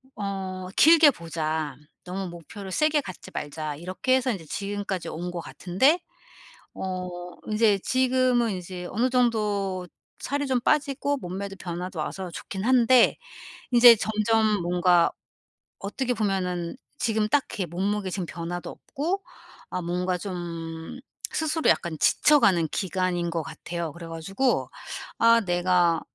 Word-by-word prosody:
어 190 -2 -4
'길게 320 -2 +7
보자. 160 - -3 0.3
너무 185 +1 -4
목표를 180 +4 -9
세게 305 +7 +2
갖지 185 - -9
말자.' 150 0 -4
이렇게 185 - 0
해서 260 -1 +1
인제 185 -7 -5
지금까지 200 +1 -4
온 175 +2 -4
것 175 - -4
같은데 225 - +2 0.8
어 185 -1 -4 0.4
인제 215 -2 +3
지금은 255 -1 +2
이제 180 -1 -6
어느 240 +5 +1
정도 210 -7 0 0.3
살이 285 +1 -2
좀 260 -2 +1
빠지고 285 +1 +1
몸매도 195 -1 -5
변화도 180 0 -5
와서 185 +4 -4
좋긴 190 +3 -6
한데 250 0 +5 0.5
이제 240 -1 +9
점점 215 -1 +1
뭔가 175 0 +3 0.7
어떻게 245 +6 -2
보면은 185 -5 -1 0.2
지금 220 -2 +1
딱히 215 -6 0
몸무게 195 +4 -2
지금 185 -2 -3
변화도 175 0 -5
없고 350 +8 -3 0.5
아 180 - -3
뭔가 180 +1 -1
좀 170 0 -6 0.3
스스로 315 0 +1
약간 170 -3 +1
지쳐가는 200 - +4
기간인 185 -2 -1
것 165 -1 -1
같아요. 165 +1 -5
그래 170 -1 -9
가지고 195 +10 -1 0.5
'아 230 0 +6
내가 175 -2 +2
190 Hz, 265 characters per minute, -26 LUFS, 175-235 Hz, 0.8 s, 이제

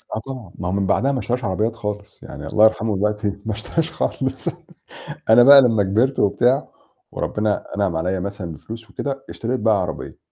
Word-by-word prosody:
آه، - - -2
طبعًا، 130 -9 -8
ما 90 - -3
هو - - -1
من 100 0 0
بعدها 135 +8 +2
ما 135 - -1
اشتراش 120 +3 -2
عربيات 110 +5 -1
خالص، 105 -2 -6
يعني - - -8
الله 110 - +5
يرحمه 110 -1 +1
دلوقتي 105 +1 -1 0.2
ما 110 - -1
اشتراش 160 +9 -2
خالص. 135 -4 -3 0.8
أنا 115 +2 +8
بقى 140 +2 +10
لمّا 115 -4 +3
كبِرت 110 +8 +1
وبتاع، 125 +7 +2 0.4
وربنا 105 -1 -1
أنعم 100 -5 0
عليّا 90 +3 -1
مثلًا 100 -3 -5
بفلوس 115 +9 -10
وكده، 135 -1 -4
اشتريت 125 +3 -3
بقى 110 -3 +3
عربية، 90 - -6
110 Hz, 180 wpm, -21 LUFS, 100-125 Hz, 0.8 s, بقى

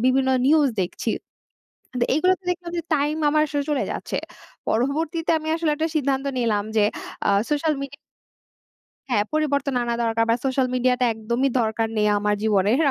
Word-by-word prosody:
বিভিন্ন 260 +1 +3 0.2
নিউজ 300 -1 +5
দেখছি। 175 - -3 1.1
এগুলো 365 +5 +4
তো - - -38
দেখলাম 350 -1 -5
যে, - - 0
টাইম 295 +1 +1
আমার 305 +1 +3
আসলে 290 -1 -1
চলে 290 -3 +1
যাচ্ছে। - - -4 0.5
পরবর্তীতে 310 +7 0
আমি 310 - -7
আসলে 325 -2 0
একটা 315 +2 0
সিদ্ধান্ত 275 -2 0
নিলাম 220 -4 +1
যে, - - +5 0.4
আ - - +3 0.2
সোশ্যাল 300 +1 +1
মিডিয়া 275 0 -6 1.1
হ্যাঁ, 240 -5 +2
পরিবর্তন 285 -3 0
আনা 235 0 -1
দরকার। 225 0 +1
বা 230 - +5
সোশ্যাল 265 -1 +1
মিডিয়া 255 0 +3
টা - - +4
একদমই 235 +5 -1
দরকার 225 0 0
নেই, 210 0 +2
আমার 210 0 +1
জীবনের। 210 +1 +3
270 Hz, 165 wpm, -23 LUFS, 230-305 Hz, 1.1 s, নিউজ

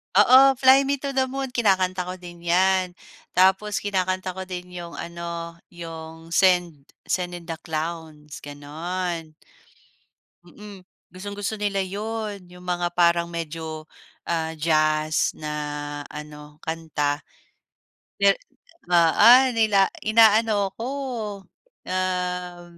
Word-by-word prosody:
Oo, 260 +6 +7
"Fly 265 +1 +5
Me 280 - +2
to 280 - -2
the 260 -1 +1
Moon" 265 0 -4
kinakanta 185 -5 +1
ko 185 - -4
din 175 -1 -11
yan. 180 +1 +2 0.4
Tapos 190 +3 +3
kinakanta 185 -2 -1
ko 190 0 -7
din 180 -1 -7
yung 175 -1 -8
ano 170 0 -6
yung 165 -1 -10
"Send 175 -6 +2 0.2
Send 180 -1 -1
in 175 0 -10
the 165 - -3
clowns," 155 -2 -5
ganon. 160 +3 -5 1.1
Mm, 200 0 -13 0.2
gustong 200 +3 -8
gusto 205 +2 -2
nila 200 -1 -1
yun, 205 0 -5
yung 180 0 -14
mga 175 -1 -1
parang 170 -1 +3
medyo, 160 -1 -6 0.4
ah, 160 -1 -1
jazz 155 -1 +1
na 150 -1 -6 0.6
ano 150 0 -10
kanta, 155 -3 -2 0.9
de 200 0 +5 0.6
ah 170 -2 +5
ah, 250 +3 +8
nila 210 -4 +3
inaano 215 -2 +4
ko, 235 - -3 1.0
um, 180 -1 -2
180 Hz, 115 wpm, -24 LUFS, 165-200 Hz, 1.1 s, ah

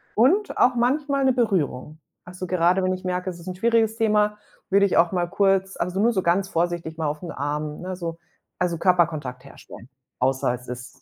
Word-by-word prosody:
und 360 - +3
auch 250 - +4
manchmal 275 +3 +1
'ne 260 - +4
Berührung. 160 - -1 0.3
Also, 180 +1 -7
gerade 180 +1 +2
wenn 185 0 +1
ich 185 - -7
merke, 180 0 -2
es 175 -2 -8
ist 170 - -13
'n 185 - -4
schwieriges 225 +2 +2
Thema, 210 -1 +2 0.3
würde 200 +1 +5
ich - - 0
auch 170 0 +4
mal 175 -2 0
kurz 195 0 +1
also, 180 +2 -2
nur 230 +4 +4
so 190 -3 0
ganz 190 +3 +1
vorsichtig 170 -2 -2
mal 160 -2 -1
auf 150 +1 -3
'n 170 - -5
Arm, 150 +1 -4
ne, 185 +1 -5
so, 170 -2 -5 0.4
also, 175 -2 0
Körperkontakt 155 -9 +1
herstellen, 115 - -13 0.3
außer 130 -1 +1
es 125 0 -13
ist 125 +1 -9
180 Hz, 200 wpm, -24 LUFS, 165-205 Hz, 0.4 s, würde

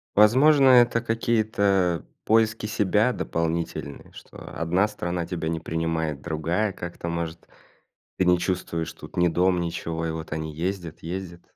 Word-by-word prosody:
Возможно, 135 +7 +6
это 120 -2 +5
какие-то 105 - +1 0.2
поиски 110 0 +2
себя 105 +3 +2
дополнительные 80 -6 -3
что, - - -13
одна 90 +5 0
страна 90 -4 -3
тебя 85 -3 -3
не 80 0 -2
принимает, 80 -3 -2
другая 85 +6 -1
как-то 85 -1 -6
может 85 0 -4 0.7
Ты 95 - +3
не 90 0 +4
чувствуешь 85 -3 -2
тут - - -13
ни 90 0 +4
дом, 90 +2 +2
ничего 85 -1 -3
и - - -1
вот 80 -1 -6
они 80 0 -4
ездят 85 0 -4
ездят. 85 0 -6
90 Hz, 140 wpm, -25 LUFS, 80-105 Hz, 0.7 s, Возможно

